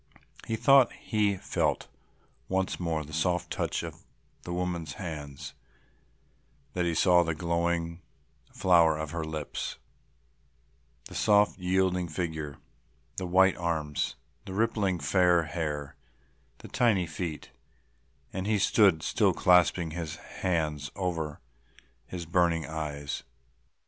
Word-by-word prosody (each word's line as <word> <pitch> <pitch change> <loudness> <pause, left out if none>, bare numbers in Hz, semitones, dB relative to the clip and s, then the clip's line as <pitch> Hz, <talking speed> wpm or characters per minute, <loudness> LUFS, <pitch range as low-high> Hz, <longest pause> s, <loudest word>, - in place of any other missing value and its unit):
He 115 - 0
thought 130 +3 +6
he 105 -3 0
felt - - -1 0.6
once 95 0 0
more 80 -3 -1
the 75 - -11
soft 90 +2 0
touch - - -1
of - - -8 0.4
the 85 - -7
woman's 85 -3 -2
hands, 75 -7 -7 1.2
that 90 -1 0
he 85 -1 0
saw 90 +1 +5
the 85 -2 -1
glowing 85 0 -1 0.5
flower 85 -4 +4
of 80 -1 -4
her 85 -1 -3
lips, 80 -2 -4 1.3
the - - -10
soft 105 -1 +3
yielding 90 -1 +1
figure, 80 -4 -4 0.6
the 95 - -2
white 95 +1 +5
arms, 80 -4 -1 0.3
the 95 - -6
rippling 105 -4 +1
fair 85 +3 +3
hair, 75 -3 -4 0.6
the - - -11
tiny 105 -7 +2
feet, 80 -1 -5 0.8
and 95 +1 -3
he 110 -1 +2
stood 95 -4 +4
still - - +2
clasping 90 -2 +4
his 80 -1 -4
hands 75 -5 -2
over 85 -6 -3 0.7
his 90 -2 -6
burning 85 -1 +2
eyes. 75 -2 -4
85 Hz, 120 wpm, -29 LUFS, 80-95 Hz, 1.3 s, thought